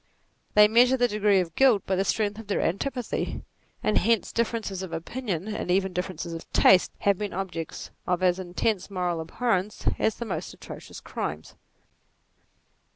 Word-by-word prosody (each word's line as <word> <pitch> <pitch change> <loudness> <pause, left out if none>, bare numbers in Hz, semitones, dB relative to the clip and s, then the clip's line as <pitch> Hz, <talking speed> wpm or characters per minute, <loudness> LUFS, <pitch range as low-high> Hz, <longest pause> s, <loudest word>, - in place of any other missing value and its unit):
They 210 0 +8
measure 245 +4 +5
the 245 -1 +3
degree 210 -3 +3
of 165 -2 -5
guilt 250 -4 +4
by 190 - 0
the 190 - +1
strength 205 +1 0
of 225 - -10
their 205 - 0
antipathy; 245 +6 -2 0.4
and 215 - +3
hence 230 -1 +1
differences 225 -4 -1
of 190 -3 -6
opinion, 190 +1 -4
and 210 - -4
even 190 +1 +2
differences 180 -2 -4
of 165 - -8
taste, 185 -1 +6
have 200 -2 +2
been 210 -1 -3
objects 170 -3 -5 0.2
of 180 0 0
as 180 0 +3
intense 185 +2 -1
moral 180 -3 -1
abhorrence 210 +3 -1
as 220 - +2
the 235 - -5
most 205 - -4
atrocious - - -10
crimes. 75 +1 -5
195 Hz, 160 wpm, -26 LUFS, 180-220 Hz, 0.4 s, They